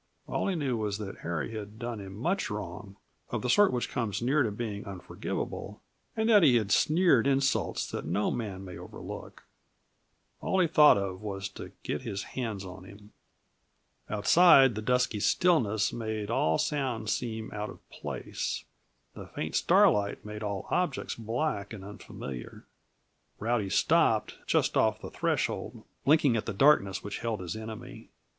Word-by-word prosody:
All - - -2
he 195 - 0
knew 135 -7 -1
was 105 -2 -2
that 105 -2 -7
Harry 85 +5 -3
had 105 -1 -7
done 120 -2 -4
him 95 -1 -8
much 175 - -1
wrong, 100 -1 -6 0.3
of - - -3
the 125 - +2
sort 205 +7 +5
which 125 -1 -1
comes 115 -5 -1
near 135 +5 +2
to 120 - +2
being 105 -1 -4
unforgivable, 95 -3 -5 0.4
and 220 0 +1
that 215 -3 +7
he 140 -7 +6
had 105 -4 +1
sneered 155 - +4
insults 135 -8 +1
that - - -4
no 105 - 0
man 100 -5 -4
may 90 -2 -8
overlook. 90 - -9 1.0
All 190 - 0
he 180 - +5
thought 150 -6 +6
of 95 -2 -3
was 95 -2 -4
to - - -9
get - - -3
his 100 0 -4
hands 110 -6 -3
on 95 0 -9
him. 100 +2 -14 1.0
Outside, 135 - +6
the 110 - -4
dusky 125 -1 +1
stillness 110 - +2
made 110 -2 -3
all 80 -8 +2
sounds 125 -7 -1
seem 110 -2 -3
out 105 0 -4
of - - -13
place; - - -4 0.5
the - - -9
faint - - -5
starlight 100 0 +3
made 105 0 -7
all 100 -3 -3
objects 180 -6 0
black 115 -2 -2
and 95 -3 -8
unfamiliar. 70 -10 -8 0.7
Rowdy 110 -3 0
stopped, - - +2
just - - +2
off - - +3
the - - -8
threshold, - - -2 0.2
blinking 145 -3 +4
at 110 - -2
the 115 - -2
darkness 100 -5 +4
which 100 0 -5
held 115 -2 -2
his 90 +2 -5
enemy. 110 +2 -8
110 Hz, 160 wpm, -29 LUFS, 100-130 Hz, 1.0 s, that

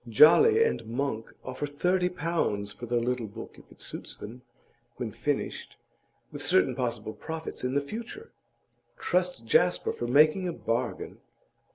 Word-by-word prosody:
Jolly 425 - +7
and 460 - 0
Monk 115 -2 -3
offer 130 +3 -4
thirty 180 +5 +1
pounds 165 - -1
for 120 - -8
the 120 +1 +1
little 120 -1 -1
book, 110 +3 -10
if - - -20
it - - -17
suits - - -7
them 115 +5 -9 0.5
when 120 -3 -4
finished, 145 +6 -3 0.6
with - - -6
certain 95 +8 +3
possible 120 -4 -3
profits 160 -3 -6
in 125 +1 -1
the 140 - +3
future. 235 - -7 0.7
Trust 180 -9 0
Jasper 180 +9 +3
for 120 - -4
making 155 +8 +4
a 175 - -2
bargain! 120 -4 -3
135 Hz, 150 wpm, -28 LUFS, 115-175 Hz, 0.7 s, Jolly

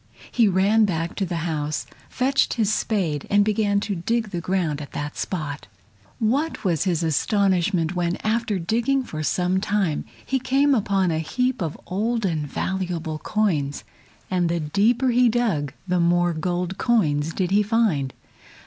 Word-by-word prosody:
He 230 -3 +4
ran 200 +4 +4
back 170 -3 -2
to 195 - 0
the 175 - -3
house, 150 -2 -2 0.2
fetched 270 +2 +1
his 215 -3 +1
spade 170 -12 -1
and 205 0 +4
began 210 -1 +2
to 205 - -2
dig 215 +5 -1
the 175 -3 -3
ground 170 -5 -1
at 140 - -9
that 145 0 -4
spot. 155 -6 -4 0.5
What 275 +9 0
was 170 -3 +1
his 175 -3 0
astonishment 180 +1 +1
when, 175 0 0
after 220 -1 0
digging 235 +10 0
for 155 -10 -6
some 180 +4 +1
time, 195 -7 0 0.2
he 265 - 0
came 275 +3 +2
upon 195 -6 +1
a 160 - 0
heap 250 +9 -1
of 160 -3 -3
old 225 +4 -1
and 155 -5 -1
valuable 175 -2 -3
coins, 155 -9 -1 0.5
and 180 -2 +1
the 170 0 0
deeper 215 - +2
he 245 0 +4
dug 210 - 0 0.2
the 180 0 +1
more 175 0 +3
gold 175 +3 -2
coins 160 -10 +2
did 185 +1 -2
he 205 +1 +4
find. 205 - +1
190 Hz, 160 wpm, -23 LUFS, 165-220 Hz, 0.5 s, He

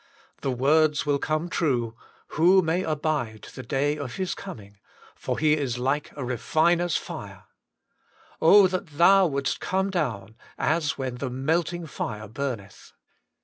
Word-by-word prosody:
The 135 - -1
words 150 +4 +2
will 145 -1 +1
come 155 +3 -1
true, 125 -10 -1 0.3
*Who 185 +4 +4
may 165 +3 0
abide 150 - -2
the - - -7
day 145 +4 -1
of 130 -5 -5
His 185 -1 -2
coming, 100 - -10 0.3
for - - -4
He 155 -1 +3
is 135 -6 -1
like 135 +4 -1
a 135 - -4
refiner's 165 +7 +1
fire.' - - -8 0.5
* - - -31
that 185 +1 +5
Thou 185 +5 +6
would 140 -2 -2
est - - -1
come 190 +1 -1
down, 110 - -3 0.2
as 155 -2 0
when 130 -2 -4
the 135 +1 -3
melting 165 +6 -1
fire 110 -7 -5
burneth 110 -4 -6
145 Hz, 145 wpm, -25 LUFS, 125-170 Hz, 0.5 s, Thou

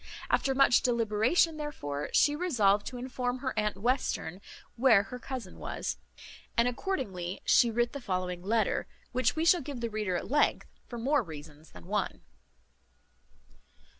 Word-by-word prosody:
After 270 -1 +2
much 270 -2 +5
deliberation, 235 - +2
therefore, 150 - -4
she 290 - +4
resolved 215 - +2
to 250 - -6
inform 250 0 -3
her 260 0 -3
aunt 210 -2 0
Western 210 -5 -1 0.3
where 230 -5 +5
her 250 +5 -8
cousin 245 -7 -7
was, - - -4 0.6
and 235 +1 +4
accordingly 205 - -3
she 240 - +5
writ 240 +1 0
the 280 - -6
following 185 -4 -2
letter, 215 +2 0 0.2
which 250 -1 +1
we 320 +1 0
shall 345 0 +5
give 275 -2 -6
the 235 -1 -3
reader 210 -4 -1
at - - -3
length, 295 +1 +2 0.2
for 240 - -7
more 275 +5 +2
reasons 155 -4 -11
than 90 -1 -14
one. - - -2
235 Hz, 150 wpm, -30 LUFS, 195-265 Hz, 0.6 s, much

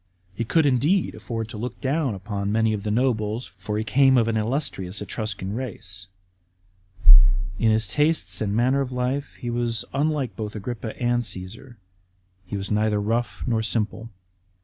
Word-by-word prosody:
He 115 - -2
could 160 +6 +3
indeed 145 +8 +2
afford 115 -2 -4
to 110 -3 -7
look 125 +3 -5
down 135 -4 0
upon 100 +1 -3
many 110 0 +2
of 105 - -2
the 105 - -3
nobles; 110 -1 +1
for 95 +3 -5
he 110 - 0
came 130 +4 +5
of 115 -2 +3
an 115 - 0
illustrious 110 -5 -2
Etruscan 100 -1 -3
race. 95 -7 -6 1.5
In 115 - +4
his 110 -1 +2
tastes 105 - +1
and 105 -1 0
manner 130 +4 +3
of 130 -2 -3
life 125 +3 -2
he 120 - -4
was 120 -1 0
unlike 145 -2 0
both 105 -1 -5
Agrippa 110 +1 -5
and 120 0 +2
Cassar. 110 +3 -7 0.7
He 100 - -3
was 100 +1 -3
neither 105 0 +2
rough 115 +4 -1
nor 115 -3 +1
simple. 110 +1 -2
115 Hz, 165 wpm, -24 LUFS, 105-125 Hz, 1.5 s, came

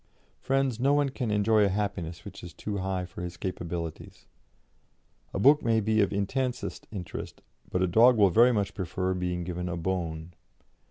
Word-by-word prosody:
Friends, 135 -3 0
no 140 +3 +3
one 145 -1 +2
can 130 -3 -3
enjoy 105 +1 +3
a 100 - +3
happiness 95 -4 -3
which - - -10
is 85 - -9
too 105 -1 -4
high 95 -1 -2
for 90 0 -9
his 90 0 -6
capabilities; 85 -3 -5 1.1
a - - -4
book 145 +9 +6
may 115 -1 +2
be 110 0 +2
of 100 - +2
intensest 125 +6 -2
interest, 95 -5 -7 0.3
but 90 - 0
a - - +3
dog 115 +7 +6
will 100 -3 +5
very 120 +6 +6
much 105 -4 -1
prefer 95 0 -2
being 90 -1 -2
given 90 0 -4
a 85 - -3
bone. 85 -2 -3
95 Hz, 175 wpm, -28 LUFS, 90-110 Hz, 1.1 s, book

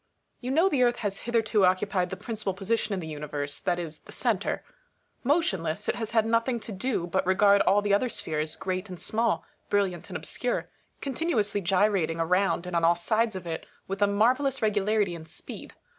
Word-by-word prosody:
You 250 - -5
know 325 +8 +4
the 285 -9 +1
Earth 240 -1 +4
has 195 -1 -1
hitherto 225 -3 +2
occupied 185 0 +2
the 190 - -4
prin 225 +3 -5
cipal 205 -3 -3
position 215 +2 0
in - - -3
the 160 - -6
Universe, 145 -2 -4
that 175 - 0
is 165 -3 -5
the - - -15
centre. 220 -6 0 0.6
Motion 280 - +2
less, 165 +5 -3
it - - +2
has 225 -2 -4
had 225 -1 +3
nothing 230 +2 +1
to 215 - -6
do 195 -2 -1
but 190 +2 0
regard 200 +2 +5
all 205 +1 +4
the 205 -1 +2
other 245 +5 +3
spheres, 155 -6 -2
great 185 +1 -3
and 180 -2 -7
small, 225 +5 0 0.2
brilliant 195 -4 0
and - - -3
obscure, - - -2 0.3
continu 290 +2 -1
ously 205 -1 0
gyrating 185 -3 +2
around 180 +2 +2
and 180 -1 -4
on 170 - +2
all 170 +1 +5
sides 220 +5 +1
of 185 -2 -6
it 165 -1 -5 0.2
with 195 +1 -4
a 205 - +6
mar 210 +5 +4
vellous 270 -1 -1
regularity 210 -2 +1
and 160 -1 -8
speed. - - -9
200 Hz, 205 wpm, -27 LUFS, 180-225 Hz, 0.6 s, a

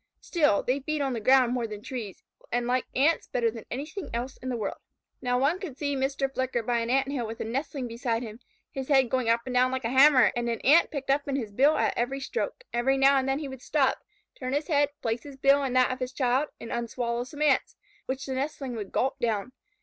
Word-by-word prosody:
Still, 295 - +2
they 255 +3 0
feed 305 +2 -3
on 270 -2 0
the 235 - -2
ground 255 +2 +4
more 240 -2 -1
than 210 -1 -6
on 205 - -16
trees, 225 -8 -6 0.3
and 245 0 0
like 250 +1 0
Ants 295 +6 +2
better 235 -2 0
than 225 -1 -9
anything 300 - -5
else 250 +3 -3
in 255 - -6
the 245 - -1
world. 210 -3 -4 0.4
Now, 250 0 +1
one 285 +8 +2
could 315 -10 -7
see 285 -1 -1
Mr. 270 0 -1
Flicker 260 -3 -1
by 235 +1 +1
an 230 0 -2
Ant 270 +2 +2
hill 245 -5 -2
with 225 +1 -7
a - - -2
nestling 265 +2 -3
beside 230 0 -2
him, 220 -1 -8 0.3
his 265 -1 -5
head 265 -4 +3
going 255 -3 +1
up 230 0 +3
and 255 - -4
down 250 +1 +3
like 260 0 -3
a 230 - -1
hammer, 265 -1 +6
and 240 0 -1
an 230 - -2
Ant 310 +5 +5
picked 275 -2 -2
up 285 +1 +1
in 275 - -1
his 230 -6 -3
bill 280 +9 +4
at - - +1
every 260 +3 -1
stroke. 480 - -4
Every 265 +3 +2
now 270 +1 +5
and 265 0 0
then 270 - +1
he 295 -1 -4
would 265 -2 -9
stop, - - +1 0.3
turn 255 0 -5
his 295 +5 -1
head, 290 -2 +3
place 225 0 -1
his 280 -2 -11
bill 275 +1 +4
in 260 -2 -2
that 255 0 +4
of 255 - -4
his 255 0 -4
child, 260 +3 +1
and 230 - -8
unswallow 235 0 -2
some 290 +4 -5
Ants, 285 -3 +2 0.3
which 265 +1 -3
the 265 - -3
nestling 270 -2 -3
would 205 -3 -6
gulp 265 +2 0
down. 230 -1 -1
260 Hz, 250 wpm, -27 LUFS, 240-275 Hz, 0.4 s, hammer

